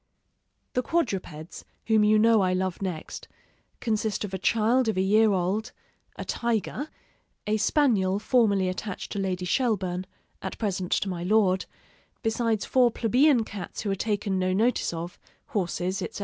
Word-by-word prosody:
The 250 - +1
quadrupeds, 190 - -3 0.2
whom 220 -1 +4
you 215 +1 +5
know 225 0 +5
I 185 -1 +2
love 185 0 -2
next, 180 -5 -5 0.5
consist 215 -3 -1
of 195 - -9
a 190 - -2
child 230 +5 +2
of 220 - 0
a - - +3
year 215 +3 +4
old, 195 +4 -1 0.4
a - - -6
tiger, 235 - -2 0.6
a 215 +1 +1
spaniel 210 -6 +2
formerly 205 -4 +2
attached 185 +2 -5
to 200 - -3
Lady 185 -2 -2
Shelburne 190 -5 0 0.3
at - - -5
present 190 -4 -2
to - - 0
my 180 -3 -3
Lord 190 -1 +2 0.6
besides 225 -2 0
four 250 -2 +4
plebeian 245 +3 +3
cats 205 -3 -7
who 205 - -2
are - - +1
taken 205 -1 -1
no 185 0 +1
notice 230 +6 +1
of, 170 +1 -6 0.3
horses, 190 -4 -2
etc. - - -5
205 Hz, 155 wpm, -26 LUFS, 185-225 Hz, 0.6 s, you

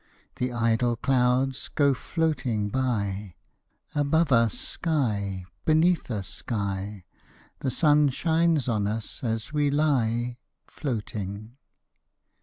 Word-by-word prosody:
The 125 0 -1
idle 120 0 +1
clouds 130 +1 +1
go 140 -2 +3
floating 130 -9 -1
by; 100 -7 -1 0.6
Above 150 +2 +2
us 115 -3 +4
sky, 105 - -1 0.2
beneath 160 +1 +3
us 100 -6 -3
sky; 100 -2 -4 0.6
The 135 - -1
sun 150 +1 +4
shines 160 0 +2
on 105 -4 +1
us 110 +3 -4
as 115 +2 -2
we 145 -1 +2
lie 125 -5 +1 0.3
Floating. 110 -4 -5
125 Hz, 100 wpm, -26 LUFS, 105-145 Hz, 0.6 s, us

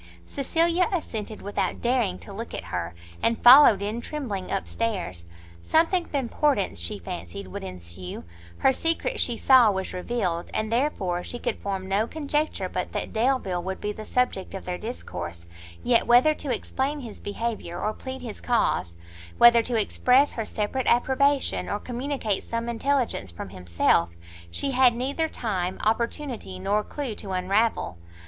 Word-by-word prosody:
Cecilia 335 +6 +1
assented 220 - -4
without 205 - -2
daring 235 -7 +1
to 200 - -9
look 230 +4 -6
at - - -5
her, 85 -1 -3 0.3
and 230 - +2
followed 240 -5 +9
in 215 +3 -2
trembling, 235 -11 -4
up 195 - -1
stairs. 185 - -3 0.4
Something 335 - +2
of - - -8
importance, 265 - +1
she 85 +4 -1
fancied, 85 +1 -7
would - - -6
ensue, 90 -1 -7 0.3
her 265 - +4
secret 330 - 0
she 240 -2 0
saw 255 -3 +6
was 190 -2 -2
revealed, 180 -3 -2
and 215 0 -1
therefore 205 -9 0
she 245 - -6
could - - -3
form 195 -2 -3
no 200 +4 +1
conjecture 300 +1 -1
but - - -4
that - - -3
Delvile 225 -6 +1
would 190 +2 -4
be 210 - -2
the 215 - -8
subject 250 -7 0
of 190 - -7
their 180 0 -3
discourse 85 - -6 0.4
yet 245 -1 +3
whether 245 +6 +6
to 290 -3 -5
explain 270 +5 -2
his 230 -4 -9
behaviour, 205 -4 -4
or 215 - -1
plead 260 +1 -7
his 225 -4 -7
cause, 95 - +1 0.4
whether 235 0 +8
to 230 -1 -1
express 255 +6 +3
her 225 - -3
separate 220 +6 -2
approbation, 265 - +2
or - - 0
communicate 245 -4 -2
some 230 0 -3
intelligence 235 - 0
from 85 +2 -8
himself, 85 -2 +1 0.4
she 275 - -1
had 255 -2 +5
neither 280 +6 -1
time, 190 -9 -2
opportunity 230 -2 -2
nor 200 +3 0
clue 275 -3 -4
to 205 -1 -6
unravel. 185 - 0
230 Hz, 160 wpm, -26 LUFS, 185-260 Hz, 0.4 s, followed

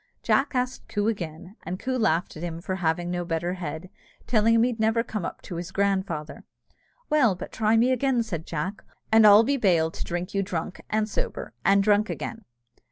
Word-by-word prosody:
Jack 275 0 +2
asked 250 +1 -2
Coo 205 0 -1
again, 180 -2 -4
and 180 +3 -5
Coo 260 0 -2
laughed 185 -8 +1
at 155 - -8
him 170 -1 -4
for 185 +2 -4
having 175 0 -1
no 175 0 -2
better 170 +1 -2
head, 170 -1 -6 0.4
telling 230 -1 +3
him 230 - +5
he'd 240 -2 0
never 225 +1 +2
come 215 -4 -4
up - - -7
to 175 - -6
his 170 +1 -5
grandfather. 190 -6 -1 0.7
"Well, 255 -10 +4
but 180 - -8
try 220 0 +2
me 245 +3 +4
again," 255 -1 +1
said 170 -8 -5
Jack, 175 +6 -4 0.3
"and 220 -1 +7
I'll 205 +2 +8
be 280 +4 +1
bail 170 -8 +2
to - - -5
drink 175 +2 -4
you 195 - +1
drunk 180 -2 -4
and 215 0 +1
sober, 215 - -4
and 195 0 +4
drunk 210 +1 +3
again." 225 -2 -5
200 Hz, 200 wpm, -26 LUFS, 175-225 Hz, 0.7 s, I'll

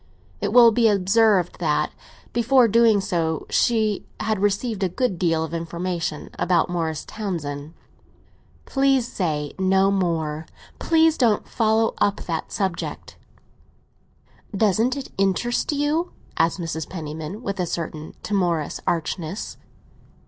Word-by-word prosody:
It 205 - -1
will 235 0 +8
be 230 +1 +3
observed 200 -1 +3
that 155 -4 +1 0.4
before 240 +1 +4
doing 225 -2 +4
so 165 -5 -1
she 220 -4 +2 0.2
had 215 -1 -1
received 205 +2 0
a 190 - +1
good 195 -2 -1
deal 165 -3 +1
of 160 0 -6
information 170 -1 -3
about 175 -1 +2
Morris 160 -3 -2
Townsend. 160 -7 -5 0.9
"Please 270 -3 +2
say 150 -8 -2
no 190 +1 +3
more; 165 -5 -1 0.3
please 320 -1 +3
don't 230 -5 +2
follow 225 0 +2
up 200 - +1
that 165 -2 -4
subject." 190 -4 -3 1.4
"Doesn't 220 +5 +2
it 275 - -7
interest 195 +8 +1
you?" 295 +4 0 0.2
asked 165 +3 +1
Mrs. 165 -2 -4
Penniman, 160 +5 -6
with 200 -4 -3
a 180 - 0
certain 155 -2 -5
timorous 175 -7 0
archness. 170 +3 -3
190 Hz, 120 wpm, -23 LUFS, 165-225 Hz, 1.4 s, will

